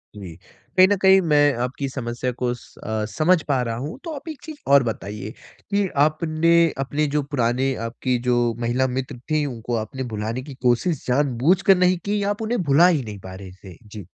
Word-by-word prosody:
जी। 95 -5 -9 0.4
कहीं 185 0 +8
न 205 - +2
कहीं 190 0 +6
मैं 145 -1 +5
आपकी 135 +2 -3
समस्या 125 -1 -3
को 125 0 -2
स 120 - -15
अ, 110 -1 -2
समझ 160 - +2
पा 135 -3 +1
रहा 115 -2 -2
हूँ। 140 +7 -6
तो 335 - -5
आप 285 +3 -10
एक 310 - -8
चीज़ 315 -2 -9
और 140 -1 +7
बताइए 105 -2 -5 0.4
कि 200 -1 +2 0.2
आपने 155 +1 0 0.3
अपने 145 +3 -1
जो 150 - +3
पुराने 135 -1 0
आपकी 125 +2 -2
जो 125 -1 +3 0.2
महिला 120 +2 0
मित्र 130 0 -4
थीं, 155 -1 +2
उनको 120 -3 -4
आपने 115 +4 -4
भुलाने 110 +4 -3
की 140 0 -9
कोशिश 125 +6 +1
जानबूझकर 145 +9 +3
नहीं 180 0 +3
की 205 0 0
या 200 - 0
आप 205 +2 -3
उन्हें 225 0 -1
भुला 150 +4 +5
ही 160 -7 +1
नहीं 105 -3 -8
पा 95 0 -10
रहे 95 -1 -10
थे? 95 -1 -14
जी। 105 -3 -9
130 Hz, 205 wpm, -22 LUFS, 115-165 Hz, 0.4 s, कहीं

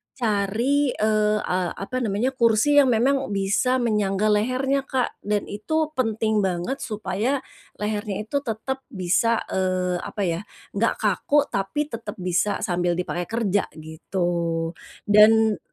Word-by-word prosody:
cari, 235 +5 +1
eee, 215 0 +2
a 180 -1 -1
apa 255 +6 -4
namanya 230 +2 0
kursi 245 +3 +4
yang 280 - +5
memang 260 +3 +2
bisa 200 +6 +1
menyangga 210 -2 +1
lehernya 255 +6 +1
Kak 255 -2 -1
dan 210 -1 +1
itu 310 +10 -2
penting 225 -5 0
banget 190 +6 -1
supaya, 215 +4 -2 0.3
lehernya 210 -1 -3
itu 255 +7 -1
tetap 265 +1 -4
bisa, 200 +5 +1
eee, 185 -1 0
apa 205 - -5
ya 170 -2 0 0.3
enggak 225 +3 +1
kaku 220 +8 +2
tapi 245 +11 -2
tetap 230 0 -6
bisa 180 +1 0
sambil 175 -3 0
dipakai 175 0 -3
kerja 205 -3 0
gitu. 165 +1 -2 0.3
Dan 215 +1 +5
210 Hz, 130 wpm, -24 LUFS, 190-245 Hz, 0.3 s, yang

